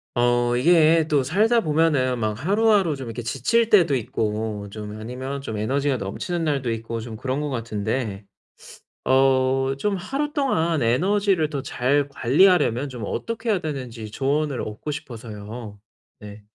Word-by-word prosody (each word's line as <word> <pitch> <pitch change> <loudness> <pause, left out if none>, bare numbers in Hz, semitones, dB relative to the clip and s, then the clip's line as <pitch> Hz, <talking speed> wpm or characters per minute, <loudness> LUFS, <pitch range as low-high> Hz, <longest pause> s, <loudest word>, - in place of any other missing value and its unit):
어 120 0 +2
이게 160 +2 +4
또 150 -3 +2
살다 215 - +2
보면은 150 - +2
막 110 -2 -1
하루하루 200 -3 +3
좀 135 -2 -7
이렇게 115 +1 -5
지칠 140 - +1
때도 175 -9 +5
있고, 110 -3 -2
좀 105 0 -7
아니면 130 +5 -5
좀 110 -5 -5
에너지가 135 +5 0
넘치는 165 - -3
날도 140 -6 0
있고 115 0 -4
좀 115 0 -7
그런 130 +5 -2
것 150 - -2
같은데 110 -3 -3 0.8
어 135 0 +3
좀 200 +8 0
하루 275 +11 -3
동안 170 - +1
에너지를 180 - +2
더 140 -2 -3
잘 140 +3 0
관리하려면 140 -1 +3
좀 125 -4 -7
어떻게 230 - -4
해야 200 - +1
되는지 125 -9 -6
조언을 140 +3 -1
얻고 105 +7 -6
싶어서요. 110 -5 -7 0.4
네. 105 0 -11
135 Hz, 300 characters per minute, -23 LUFS, 115-160 Hz, 0.8 s, 때도